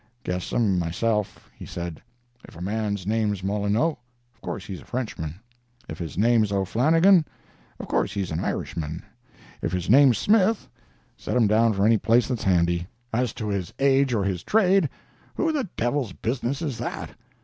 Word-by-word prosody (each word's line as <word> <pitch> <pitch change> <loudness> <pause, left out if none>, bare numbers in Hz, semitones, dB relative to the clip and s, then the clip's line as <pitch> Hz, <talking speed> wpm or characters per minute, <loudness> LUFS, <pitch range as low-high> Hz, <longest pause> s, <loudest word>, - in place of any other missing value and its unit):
'Guess 90 0 -3
'em, 100 -6 +2
myself,' 105 +5 -1
he - - -12
said. 85 -2 -6 0.4
'If - - -14
a - - -11
man's 100 -1 -2
name's 105 -2 0
Molineux, 105 +10 +1 0.4
of - - -36
course 95 - -5
he's 95 -3 -7
a - - -16
Frenchman; 105 -11 -4 0.5
if - - -7
his 85 -3 -6
name's 110 -1 +3
O'Flannigan, 155 - +4 0.6
of - - -6
course - - 0
he's 95 -4 -3
an 80 - -2
Irishman; 80 -1 -3 0.6
if - - -2
his 90 +1 -1
name's 130 -3 +6
Smith, 215 - +2 0.5
set - - -2
him 120 - +4
down 110 +2 +3
for 100 0 +1
any 110 -1 +4
place 115 +2 +3
that's 125 -4 -2
handy; 85 -2 +2 0.3
as 120 0 +1
to 110 - -5
his 95 -4 -3
age 135 -1 +3
or 110 -4 +1
his 95 -3 -1
trade, 195 - +3 0.5
who 325 - +1
the 275 - -2
devil's 120 -3 -1
business 125 +4 -2
is 135 -7 -3
that? 120 - -5
110 Hz, 170 wpm, -25 LUFS, 95-130 Hz, 0.6 s, name's